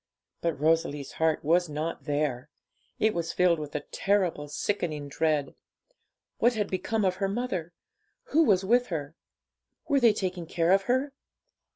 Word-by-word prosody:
But 165 -5 -1
Rosalie's 150 -2 +1
heart 160 -1 0
was 170 +3 +2
not 155 +3 -4
there. 145 -3 -1 0.5
It 220 0 +2
was 170 -1 -2
filled 175 -2 +3
with 150 -1 -7
a 150 - -1
terrible, 185 -7 0
sickening 155 -2 -2
dread. 150 -1 0 0.9
What 240 +1 +3
had 210 -2 -2
become 205 +3 0
of 185 -1 +1
her 195 0 0
mother? 195 -7 -3 0.6
Who 320 - +4
was 195 - +3
with 245 +4 +3
her? 150 -4 -4 0.7
Were 285 -3 +3
they 235 -4 +5
taking 185 -4 -3
care 170 +1 +1
of 195 0 +4
her? 265 +3 +1
175 Hz, 155 wpm, -28 LUFS, 155-205 Hz, 0.9 s, they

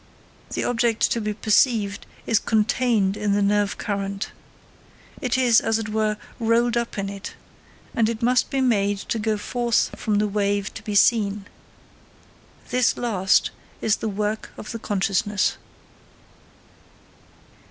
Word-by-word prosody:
The - - -1
object 235 -2 +1
to 235 -3 0
be 210 0 -2
perceived 215 -2 +2 0.2
is 225 - +3
contained 220 -2 +1
in 210 -1 0
the 205 - +2
nerve 205 0 +1
current. 200 -1 -3 0.9
It 255 0 0
is, 245 -3 +5
as 225 0 +1
it 220 -1 -4
were, 215 0 0 0.2
rolled 235 +1 +2
up 235 -2 -2
in 200 0 -2
it; 200 0 -7 0.6
and 225 -1 +2
it 230 0 -4
must 250 0 +3
be 270 - 0
made 205 -5 +2
to 225 +3 -3
go 215 0 0
forth 235 +2 0
from 215 - 0
the 210 +1 +2
wave 200 0 -1
to - - -8
be 210 - -4
seen. 205 -2 +3 1.3
This 250 -1 +2
last 195 -6 +2 0.3
is 220 - +1
the 220 - -3
work 210 +1 -2
of - - -7
the 230 - -5
consciousness. 205 +1 0
215 Hz, 140 wpm, -23 LUFS, 205-230 Hz, 1.3 s, is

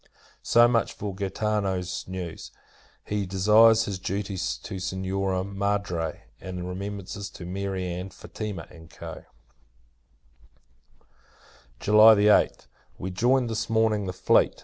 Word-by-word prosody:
So 120 0 +5
much 115 -2 +1
for 100 -1 -5
Gaetano's 95 -2 -2
news. 90 -3 -6 0.6
He 105 -2 -2
desires 105 +4 +5
his 100 -2 -4
duty 95 +2 -3
to 95 +2 -4
Signora 95 0 -2
Madre; 100 -4 -2 0.2
and 90 -1 -6
remembrances 100 +1 -6
to 90 - -10
Mary 95 0 -3
Ann, 90 +2 -4
Fatima, 100 -5 -7
&c. 80 -1 -14 2.9
[July 110 +1 +7
8th. 105 -8 +3 0.3
We 95 - -5
joined, 125 +6 +2
this 110 - -2
morning, 110 -3 +2
the 90 - -3
fleet. 95 - +2
100 Hz, 110 wpm, -26 LUFS, 95-105 Hz, 2.9 s, July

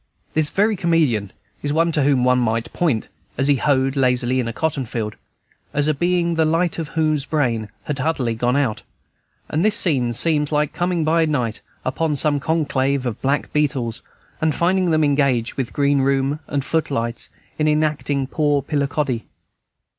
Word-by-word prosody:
This 155 -2 +1
very 210 +7 +2
comedian 155 - +1 0.3
is 145 - -2
one 165 +2 +2
to 150 - +1
whom 135 -2 +3
one 125 0 +3
might 115 -1 -1
point, 150 -11 0 0.3
as 135 +2 +2
he 140 - +4
hoed 135 0 +1
lazily 125 -1 +1
in 120 - -1
a - - -2
cotton 145 +2 -1
field, 110 -3 -4 0.6
as 145 +1 +2
a 155 - +3
being 175 +2 +1
the 160 -1 +2
light 165 +2 +1
of 160 - -3
whose 155 -3 +2
brain 120 -9 -1
had 145 -2 -4
utterly 135 -5 0
gone 120 +3 0
out; 135 -7 0 0.7
and 155 +3 0
this 215 0 +3
scene 130 -9 +2
seems 150 +3 +1
like 150 -1 +1
coming 175 -2 0
by 160 +1 +3
night 125 -8 -1 0.2
upon 150 +4 0
some 145 0 +1
conclave 140 -3 0
of 120 -3 -4
black 140 +2 -1
beetles, 135 -6 0 0.4
and 155 -1 +1
finding 185 +1 +2
them 155 -1 +3
engaged, 140 -5 +1
with 130 -3 -3
green 140 -1 +2
room 135 +2 +1
and 140 -1 -2
foot 160 -1 0
lights, 115 -3 -3 0.3
in 155 - +2
enacting 150 -2 +1
"Poor 145 0 0
Pillicoddy." 140 -4 -1
145 Hz, 175 wpm, -21 LUFS, 130-155 Hz, 0.7 s, he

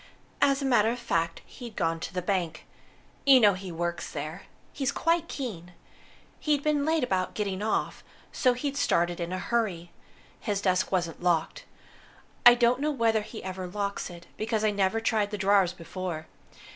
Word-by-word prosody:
As 275 0 +3
a - - -1
matter 225 -5 +4
of 240 - -2
fact, 165 -8 -1
he'd 235 -4 -10
gone 165 -3 0
to - - -5
the 180 -1 -3
bank. 180 -3 -2 0.6
You 270 -2 +7
know 205 -4 +6
he 185 0 -7
works 170 +1 -3
there. 155 +5 -6 0.3
He's 270 -3 -1
quite 335 0 +1
keen. 180 - -6 0.7
He'd 295 -2 +1
been 295 -2 +1
late 320 -1 +2
about 185 -6 -1
getting 200 -2 -2
off, 215 +1 -1 0.3
so 255 - +3
he'd 275 +3 -3
started 175 -8 +1
in 170 0 -3
a 185 - -2
hurry. 185 -6 -1 0.5
His 205 -2 -1
desk 185 -2 +1
wasn't 175 -4 -1
locked. 175 - 0 0.8
I 240 - +10
don't 245 +2 +3
know 300 - +1
whether 230 -6 +2
he 215 +1 -9
ever 185 -1 -5
locks 200 +2 -3
it, 175 -1 -11
because 220 0 -1
I 215 - +3
never 200 +2 +1
tried 220 -2 +1
the 210 - -4
drawers 195 -2 +3
before. 175 -2 -6
200 Hz, 175 wpm, -28 LUFS, 180-240 Hz, 0.8 s, I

